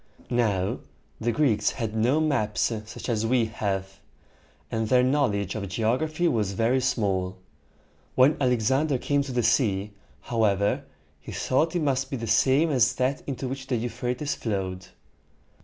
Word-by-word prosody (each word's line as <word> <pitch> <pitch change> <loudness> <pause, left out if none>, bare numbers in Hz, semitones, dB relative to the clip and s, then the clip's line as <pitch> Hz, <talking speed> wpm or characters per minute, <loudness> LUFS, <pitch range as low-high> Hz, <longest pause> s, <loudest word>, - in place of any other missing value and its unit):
Now, 105 -6 +1 0.4
the 120 +1 0
Greeks 115 -6 +2
had 110 -2 -4
no 120 +7 +2
maps 135 -9 0 0.2
such 115 - -8
as 115 -3 0
we 120 0 +2
have; 95 -3 -3 0.7
and 110 -1 -1
their 125 -1 +5
knowledge 125 -8 +1
of 100 -3 -4
geography 130 - 0
was 105 - 0
very 115 +6 +2
small. 95 -7 0 0.8
When 130 +4 +5
Alexander 130 +3 +2
came 145 +3 +1
to 140 -1 -5
the 120 -1 0
sea, 105 -4 +1 0.3
however, 105 -4 +1 0.3
he - - -10
thought 160 +6 0
it 170 - +1
must 135 -2 0
be 135 - -3
the 115 - -4
same 135 +8 +3
as 125 -1 +3
that 130 +2 0
into 135 -1 -3
which 130 0 -6
the 130 - 0
Euphrates 120 +4 -2
flowed. 95 -4 -3
120 Hz, 150 wpm, -26 LUFS, 105-135 Hz, 0.8 s, their